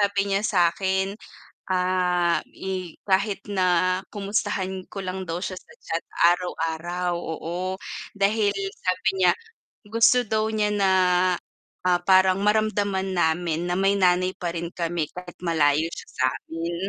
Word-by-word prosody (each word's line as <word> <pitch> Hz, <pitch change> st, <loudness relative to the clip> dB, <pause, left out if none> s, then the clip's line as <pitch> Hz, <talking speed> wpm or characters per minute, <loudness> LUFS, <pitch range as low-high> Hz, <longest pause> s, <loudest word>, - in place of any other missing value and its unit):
sabi 200 Hz, -1 st, +1 dB
niya 195 Hz, -, +2 dB
sa 210 Hz, -2 st, 0 dB
akin, 190 Hz, +2 st, 0 dB, 0.6 s
ah, 180 Hz, -1 st, +2 dB, 0.2 s
i 185 Hz, -3 st, -5 dB
kahit 195 Hz, +1 st, +1 dB
na 185 Hz, -2 st, +2 dB, 0.2 s
kumustahan 195 Hz, -2 st, -2 dB
ko 195 Hz, -, -4 dB
lang 185 Hz, 0 st, -4 dB
daw 170 Hz, +1 st, -4 dB
siya 185 Hz, -1 st, -4 dB
sa -, -, -14 dB
chat 165 Hz, +1 st, -3 dB, 0.2 s
araw-araw, 175 Hz, 0 st, +1 dB
oo. 175 Hz, +3 st, -4 dB, 0.3 s
Dahil 205 Hz, +1 st, +2 dB, 0.3 s
sabi 185 Hz, +1 st, 0 dB
niya, 185 Hz, -1 st, +5 dB, 0.6 s
gusto 230 Hz, +3 st, +5 dB
daw 220 Hz, 0 st, 0 dB
niya 210 Hz, -1 st, +1 dB
na, 195 Hz, -2 st, +2 dB, 0.9 s
ah, 180 Hz, -1 st, +4 dB
parang 190 Hz, 0 st, +5 dB
maramdaman 205 Hz, -3 st, +1 dB
namin 165 Hz, 0 st, +1 dB
na 175 Hz, -, -1 dB
may 195 Hz, +1 st, +3 dB
nanay 185 Hz, -1 st, +3 dB
pa 175 Hz, -1 st, -3 dB
rin 170 Hz, 0 st, -4 dB
kami 170 Hz, -3 st, -2 dB
kahit 180 Hz, -1 st, -9 dB
malayo 160 Hz, -2 st, +2 dB
siya -, -, -9 dB
samin 165 Hz, +6 st, -2 dB
185 Hz, 135 wpm, -24 LUFS, 175-195 Hz, 0.9 s, niya